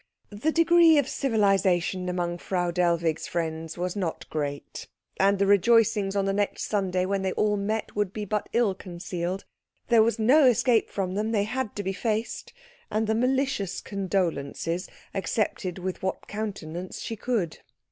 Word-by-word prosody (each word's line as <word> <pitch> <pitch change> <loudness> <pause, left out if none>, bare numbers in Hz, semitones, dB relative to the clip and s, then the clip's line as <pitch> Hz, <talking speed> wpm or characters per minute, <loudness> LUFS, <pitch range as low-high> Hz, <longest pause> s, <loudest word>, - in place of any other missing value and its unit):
The 215 +10 0
degree 335 -1 +6
of 285 -3 +2
civilisation 195 -7 +1
among 175 -1 -2
Frau 175 -1 -1
Dellwig's 170 -2 +1
friends 160 -1 -3
was 180 +1 -2
not 180 -5 -3
great, 145 -2 -4 0.3
and 195 +1 +4
the 200 - +2
rejoicings 205 0 +4
on 200 -1 +1
the 195 - +1
next 205 0 -1
Sunday 185 -3 0
when 195 +1 -1
they 190 -1 -1
all 210 -1 +1
met 210 +2 -2
would 205 -2 0
be 210 0 -4
but 210 +1 -2
ill 230 -4 +2
concealed; 180 0 -5 0.4
there 230 -2 +6
was 225 0 +2
no 265 +7 +5
escape 245 -2 +3
from 185 -2 -2
them, 215 +3 -1
they 210 -3 +2
had 250 +1 -3
to 205 - -3
be 190 0 -2
faced, 220 +2 -2 0.4
and 215 +1 0
the 220 - +1
malicious 250 -5 0
condolences 180 -3 -2 0.2
accepted 190 -1 -1
with 185 0 -4
what 190 - -3
countenance 185 -5 -5
she 225 - -4
could. 215 -7 -2
195 Hz, 160 wpm, -26 LUFS, 180-220 Hz, 0.4 s, degree